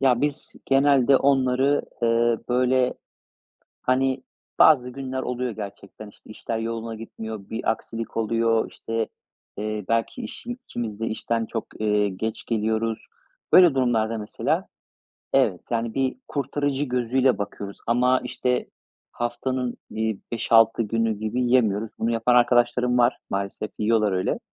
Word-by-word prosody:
Ya, 125 Hz, -3 st, +3 dB
biz 145 Hz, -1 st, -2 dB
genelde 135 Hz, -1 st, +5 dB
onları, 135 Hz, +1 st, +2 dB, 0.2 s
eee, 115 Hz, 0 st, +3 dB
böyle, 125 Hz, +1 st, +2 dB, 0.9 s
hani, 130 Hz, +1 st, +1 dB, 0.4 s
bazı 125 Hz, -5 st, +6 dB
günler 130 Hz, 0 st, -4 dB
oluyor 125 Hz, 0 st, -2 dB
gerçekten. 100 Hz, -1 st, -9 dB
İşte, 105 Hz, -, -18 dB
işler 115 Hz, +1 st, -4 dB
yoluna 115 Hz, 0 st, -4 dB
gitmiyor. 110 Hz, -2 st, -8 dB
Bir 110 Hz, -, -1 dB
aksilik 115 Hz, 0 st, -5 dB
oluyor, 115 Hz, 0 st, +1 dB
işte, 115 Hz, 0 st, -3 dB, 0.5 s
eee, 105 Hz, 0 st, -3 dB
belki 115 Hz, -, 0 dB
işin 240 Hz, +1 st, -6 dB
ikimiz 110 Hz, -3 st, -5 dB
de 115 Hz, -, -1 dB
işten, 115 Hz, +1 st, -1 dB
eee, 115 Hz, -, -2 dB
çok 115 Hz, -, -4 dB, 0.5 s
geç 110 Hz, 0 st, -3 dB
geliyoruz. 110 Hz, 0 st, -1 dB, 0.5 s
Böyle 175 Hz, -6 st, +8 dB
durumlarda 115 Hz, -3 st, +1 dB
mesela 105 Hz, -, -1 dB, 0.7 s
evet, 90 Hz, -, +3 dB
yani, 115 Hz, -1 st, -1 dB
bir 135 Hz, -1 st, 0 dB
kurtarıcı 145 Hz, 0 st, -1 dB
gözüyle 125 Hz, 0 st, +1 dB
bakıyoruz 100 Hz, 0 st, -6 dB
Ama, 125 Hz, +2 st, +3 dB
işte, 125 Hz, 0 st, -1 dB, 0.4 s
haftanın, 125 Hz, +1 st, -2 dB
iii, 110 Hz, -2 st, -2 dB
5-6 115 Hz, 0 st, +4 dB
günü 115 Hz, -1 st, 0 dB
gibi 110 Hz, +3 st, -2 dB
yiyemiyoruz. 115 Hz, -4 st, +2 dB
Bunu 115 Hz, -, 0 dB
yapan 115 Hz, +2 st, +2 dB
arkadaşlarım 125 Hz, 0 st, +3 dB
var, 120 Hz, +1 st, +4 dB
maalesef 100 Hz, +2 st, -3 dB
yiyorlar 110 Hz, -2 st, +2 dB
öyle 95 Hz, 0 st, 0 dB
115 Hz, 130 wpm, -24 LUFS, 110-130 Hz, 0.9 s, Böyle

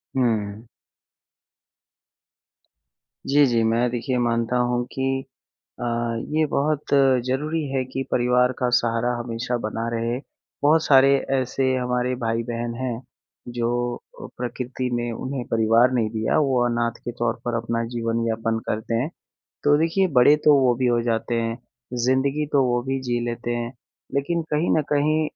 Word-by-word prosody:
हुँ। 110 Hz, -3 st, -1 dB, 2.6 s
जी, 145 Hz, +1 st, +5 dB
जी। 115 Hz, -2 st, +2 dB
मैं 115 Hz, +2 st, +2 dB
देखिए 125 Hz, +1 st, -2 dB
मानता 115 Hz, +1 st, 0 dB
हूँ 120 Hz, 0 st, 0 dB
कि 135 Hz, 0 st, -1 dB, 0.6 s
अ, -, -, -3 dB, 0.5 s
ये 155 Hz, -, +4 dB
बहुत 150 Hz, +1 st, 0 dB, 0.4 s
ज़रूरी 150 Hz, +5 st, -1 dB
है 130 Hz, -1 st, +1 dB
कि 130 Hz, +1 st, -4 dB
परिवार 125 Hz, +1 st, +3 dB
का 125 Hz, -, +1 dB
सहारा 115 Hz, +1 st, 0 dB
हमेशा 120 Hz, +1 st, -3 dB
बना 115 Hz, +2 st, -2 dB
रहे। 115 Hz, +2 st, -1 dB, 0.4 s
बहुत 155 Hz, +2 st, +4 dB
सारे 135 Hz, -1 st, +6 dB, 0.3 s
ऐसे 130 Hz, +1 st, -1 dB
हमारे 125 Hz, 0 st, 0 dB
भाई-बहन 115 Hz, +1 st, -2 dB
हैं 125 Hz, -1 st, -3 dB, 0.6 s
जो, 120 Hz, +1 st, 0 dB, 0.4 s
प्रकृति 125 Hz, +1 st, -4 dB
ने 120 Hz, 0 st, -2 dB
उन्हें 130 Hz, +1 st, -4 dB
परिवार 115 Hz, +3 st, +4 dB
नहीं 115 Hz, -3 st, +1 dB
दिया, 110 Hz, +6 st, 0 dB
वो 130 Hz, -4 st, +2 dB
अनाथ 120 Hz, -1 st, -1 dB
के 120 Hz, -, -4 dB
तौर 120 Hz, -1 st, 0 dB
पर 120 Hz, -1 st, -2 dB
अपना 115 Hz, 0 st, -1 dB
जीवन 115 Hz, 0 st, -1 dB
यापन 115 Hz, 0 st, -1 dB
करते 110 Hz, +2 st, -2 dB
हैं। 150 Hz, +6 st, -2 dB, 0.5 s
तो 145 Hz, 0 st, +5 dB
देखिए 165 Hz, +4 st, +2 dB
बड़े 145 Hz, +4 st, +7 dB
तो 150 Hz, -1 st, +7 dB
वो 125 Hz, -2 st, +4 dB
भी 125 Hz, -, +3 dB
हो 120 Hz, -1 st, +2 dB
जाते 115 Hz, 0 st, -1 dB
हैं, 115 Hz, +1 st, -2 dB, 0.5 s
ज़िंदगी 135 Hz, +3 st, +1 dB
तो 140 Hz, -2 st, +4 dB
वो 120 Hz, 0 st, +1 dB
भी 135 Hz, 0 st, 0 dB
जी 120 Hz, 0 st, +1 dB
लेते 120 Hz, 0 st, -3 dB
हैं, 120 Hz, +1 st, -3 dB, 0.4 s
लेकिन 165 Hz, +5 st, 0 dB
कहीं 155 Hz, +3 st, +1 dB
न -, -, +3 dB
कहीं 150 Hz, +2 st, +2 dB
120 Hz, 150 wpm, -23 LUFS, 115-135 Hz, 2.6 s, बड़े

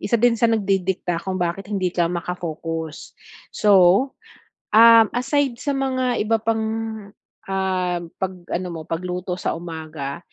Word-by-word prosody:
isa 235 Hz, -, +1 dB
din 245 Hz, 0 st, +5 dB
sa 235 Hz, -, 0 dB
nagdidikta 190 Hz, -5 st, 0 dB
kung 190 Hz, -1 st, -2 dB
bakit 175 Hz, +3 st, -2 dB
hindi 190 Hz, -3 st, 0 dB
ka 170 Hz, -1 st, +1 dB
maka-focus. 165 Hz, -2 st, -5 dB, 0.4 s
So, 210 Hz, -, -1 dB, 1.1 s
um, 230 Hz, 0 st, +8 dB
aside 270 Hz, +1 st, +1 dB
sa 285 Hz, -, -3 dB
mga 260 Hz, -2 st, 0 dB
iba 225 Hz, +1 st, +1 dB
pang, 225 Hz, 0 st, 0 dB, 0.8 s
ah, 185 Hz, -2 st, -1 dB, 0.2 s
'pag 190 Hz, -1 st, -2 dB, 0.2 s
ano 180 Hz, +1 st, -2 dB
mo, 160 Hz, -, -6 dB
pagluto 180 Hz, +2 st, -4 dB
sa -, -, -1 dB
umaga, 160 Hz, -3 st, -6 dB
185 Hz, 135 wpm, -22 LUFS, 170-225 Hz, 1.1 s, um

